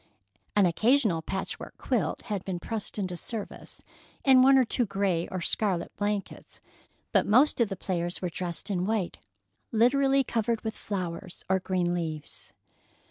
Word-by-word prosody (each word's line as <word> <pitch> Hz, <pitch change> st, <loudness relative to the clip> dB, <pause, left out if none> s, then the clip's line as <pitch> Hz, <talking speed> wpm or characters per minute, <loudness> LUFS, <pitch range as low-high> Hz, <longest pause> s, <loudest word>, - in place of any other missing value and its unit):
An 205 Hz, -2 st, +5 dB
occasional 215 Hz, 0 st, +3 dB
patchwork 190 Hz, +3 st, -5 dB
quilt -, -, -1 dB
had 205 Hz, -4 st, -3 dB
been 185 Hz, -2 st, -3 dB
pressed 220 Hz, +3 st, -4 dB
into 185 Hz, -3 st, -2 dB
service, 215 Hz, +4 st, -6 dB, 0.4 s
and 260 Hz, -2 st, +7 dB
one 270 Hz, +1 st, +7 dB
or 260 Hz, -, +5 dB
two 240 Hz, 0 st, 0 dB
gray 190 Hz, -4 st, 0 dB
or 185 Hz, -2 st, -4 dB
scarlet 185 Hz, -2 st, 0 dB
blankets, 205 Hz, -1 st, -3 dB, 0.5 s
but -, -, +3 dB
most 255 Hz, +5 st, +4 dB
of 225 Hz, -, +3 dB
the 195 Hz, -, -3 dB
players 175 Hz, -2 st, -3 dB
were 180 Hz, -, -2 dB
dressed 175 Hz, +3 st, -4 dB
in 185 Hz, -1 st, 0 dB
white 215 Hz, -5 st, -1 dB, 0.5 s
literally 270 Hz, +4 st, +4 dB
covered 230 Hz, -2 st, -1 dB
with 220 Hz, -1 st, -3 dB
flowers 180 Hz, -2 st, -5 dB
or 190 Hz, 0 st, +2 dB
green 180 Hz, -2 st, 0 dB
leaves. 160 Hz, -4 st, -5 dB
195 Hz, 150 wpm, -28 LUFS, 180-225 Hz, 0.5 s, and